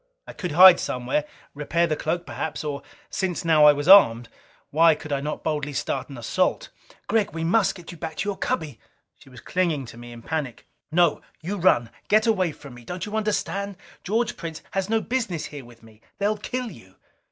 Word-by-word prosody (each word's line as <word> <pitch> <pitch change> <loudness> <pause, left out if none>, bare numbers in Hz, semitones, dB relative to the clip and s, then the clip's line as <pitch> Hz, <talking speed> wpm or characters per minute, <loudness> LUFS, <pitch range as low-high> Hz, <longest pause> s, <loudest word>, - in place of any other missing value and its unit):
I - - -10
could 180 -6 -5
hide 180 +2 +9
somewhere, 125 +4 -2 0.3
repair 160 +4 0
the 155 - -1
cloak 170 +3 -2
perhaps. 160 - -5
Or, 145 -2 -4 0.3
since 185 -3 -2
now 155 -2 +5
I 150 - +8
was 145 +2 -4
armed, 120 -12 +7 0.4
why 160 +1 +5
could 155 0 -10
not 140 +1 -1
I - - -27
boldly 145 -2 -2
start - - -3
an 135 - -9
assault? 120 - -1 0.4
"Gregg, 210 -4 0
we 165 - -3
must 195 +3 +2
get 175 -3 -10
you 170 - -12
back 160 -2 -5
to 205 - -2
your 200 - -2
cubby!" 150 -9 -3 0.4
She - - -18
was 125 -2 -13
clinging 170 -7 -1
to 115 0 -12
me 120 0 -10
in 120 -1 -11
panic. 150 -6 -4 0.3
"No. 170 -1 +3 0.2
You 190 +6 -4
run! 145 -11 +3 0.2
Get 215 +1 +4
away 190 -7 +2
from 140 -3 -13
me! 120 0 -13
Don't 180 +8 -5
you 210 0 -6
understand? 200 -2 -2 0.3
George 225 +4 0
Prince 165 -2 -7
has 195 0 -2
no 225 0 +2
business 225 -12 -2
here 145 -4 -9
with 120 -1 -17
me! 110 -1 -18 0.2
They'll 205 +1 +1
kill 245 +2 -4
you!" 95 - -16
165 Hz, 205 wpm, -24 LUFS, 140-195 Hz, 0.4 s, hide